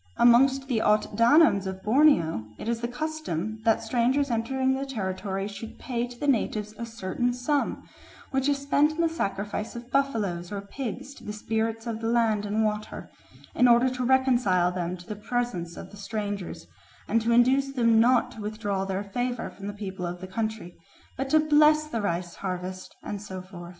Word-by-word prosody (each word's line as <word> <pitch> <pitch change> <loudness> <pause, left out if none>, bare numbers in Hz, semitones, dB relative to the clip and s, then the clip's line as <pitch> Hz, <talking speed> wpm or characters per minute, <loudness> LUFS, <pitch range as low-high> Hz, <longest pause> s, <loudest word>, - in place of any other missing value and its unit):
Amongst 265 +3 +5
the 235 -5 0
Ot 210 -1 +2
Danoms 230 - +5
of 190 0 -6
Borneo 210 - +3
it - - -7
is 230 0 -1
the 235 - -1
custom 240 - -4
that 225 -1 +3
strangers 250 +4 +1
entering 260 +3 +1
the 265 +1 -2
territory 195 -5 -3
should 210 +2 -8
pay 240 -1 -2
to 245 0 -12
the 290 - -3
natives 215 -5 0
a 235 - -4
certain 230 +2 -2
sum, 255 +4 -1 0.4
which 270 +1 +1
is 285 - +2
spent 285 +2 +2
in 330 - -1
the 335 - +4
sacrifice 210 -8 -3
of 240 +1 -9
buffaloes 210 -11 0
or 200 - -3
pigs 255 +6 -6
to - - -15
the 210 - -5
spirits 225 +1 -2
of 230 -2 -3
the 225 - -1
land 225 -3 +2
and 215 +2 +1
water, 210 0 -4 0.4
in 250 - +4
order 240 +2 +5
to 255 0 -3
reconcile 245 -9 +3
them 180 0 -3
to 175 - -13
the 210 - -5
presence 205 -6 -3
of - - -9
the 205 - -12
strangers, 205 - -4 0.4
and 230 +2 +2
to 230 +1 0
induce 260 +3 +4
them 230 -4 +3
not 245 +1 +4
to 220 - -10
withdraw 205 -2 -2
their 195 +1 -2
favour 245 +4 -3
from 195 0 -9
the - - -2
people 195 -3 -5
of 175 +1 -5
the 185 - -7
country, 215 -2 -4 0.4
but 270 0 -3
to 310 - +5
bless 305 0 +5
the 235 -7 -3
rice 175 -2 -2
harvest, 185 0 -5
and 205 -1 -5
so 190 -2 -7
forth. 180 -2 -10
225 Hz, 190 wpm, -27 LUFS, 200-255 Hz, 0.4 s, Amongst